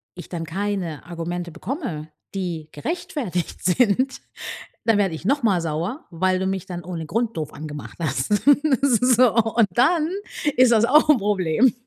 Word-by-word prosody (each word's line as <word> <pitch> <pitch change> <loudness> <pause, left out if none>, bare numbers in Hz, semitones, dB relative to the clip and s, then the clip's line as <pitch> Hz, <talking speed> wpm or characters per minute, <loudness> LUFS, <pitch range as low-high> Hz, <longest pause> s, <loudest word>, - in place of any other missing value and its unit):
ich 175 - -10
dann 165 -2 -4
keine 185 -3 -3
Argumente 175 0 -5
bekomme, 180 - -5 0.3
die 170 -5 -4
gerechtfertigt 290 - -4
sind, 250 +7 +2 0.6
dann 225 -2 +4
werde 190 -5 +1
ich 160 - -10
noch 280 +6 +2
mal 195 -6 +3
sauer, 170 - -3
weil 185 +2 +1
du 190 - -1
mich 190 -1 -2
dann 175 -1 -6
ohne 165 -2 -5
Grund 230 +3 -1
doof 155 -2 -4
angemacht 150 -1 -8
hast. 155 +5 0 0.4
So, 250 -2 +4
und 225 -1 +3
dann 310 - +3 0.5
ist 255 -1 +5
das 230 0 +5
auch 300 +4 +5
'n 300 - +7
Problem. 205 +2 +2
195 Hz, 155 wpm, -23 LUFS, 170-245 Hz, 0.6 s, n